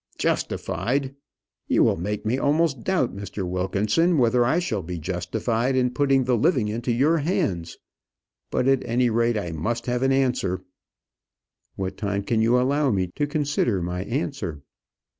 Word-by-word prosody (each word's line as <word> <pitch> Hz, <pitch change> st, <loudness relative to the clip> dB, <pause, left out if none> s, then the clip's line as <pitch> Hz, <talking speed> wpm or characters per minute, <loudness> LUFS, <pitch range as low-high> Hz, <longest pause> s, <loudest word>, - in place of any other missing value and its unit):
"Justified! 135 Hz, +2 st, -1 dB, 0.5 s
you -, -, +3 dB
will -, -, +3 dB
make 105 Hz, +5 st, -4 dB
me 120 Hz, +5 st, 0 dB
almost 145 Hz, -3 st, +1 dB
doubt, 175 Hz, -, 0 dB
Mr. 100 Hz, -1 st, -5 dB
Wilkinson, 105 Hz, -, +1 dB
whether 120 Hz, -1 st, +3 dB
I 130 Hz, +7 st, +2 dB
shall 130 Hz, -, -1 dB
be 90 Hz, +1 st, -5 dB
justified 110 Hz, -, -1 dB
in 125 Hz, -1 st, +2 dB
putting 135 Hz, -2 st, +3 dB
the 125 Hz, 0 st, +2 dB
living 120 Hz, -3 st, +2 dB
into 120 Hz, +3 st, -2 dB
your 145 Hz, +8 st, +3 dB
hands; 95 Hz, -, -1 dB, 0.7 s
but, 125 Hz, -, 0 dB
at 135 Hz, -1 st, +3 dB
any 120 Hz, +1 st, +1 dB
rate, 115 Hz, 0 st, +2 dB
I 90 Hz, -5 st, -3 dB
must 115 Hz, +10 st, -2 dB
have 125 Hz, 0 st, -1 dB
an 135 Hz, 0 st, +2 dB
answer." 125 Hz, -9 st, 0 dB, 1.1 s
"What 95 Hz, -1 st, -4 dB
time 100 Hz, -2 st, -2 dB
can 110 Hz, +2 st, +1 dB
you 120 Hz, +3 st, +4 dB
allow 140 Hz, +3 st, +2 dB
me 95 Hz, -5 st, 0 dB
to 145 Hz, -, 0 dB
consider 145 Hz, -8 st, 0 dB
my 90 Hz, +1 st, -3 dB
answer?" 115 Hz, -, -3 dB
120 Hz, 160 wpm, -24 LUFS, 100-135 Hz, 1.1 s, you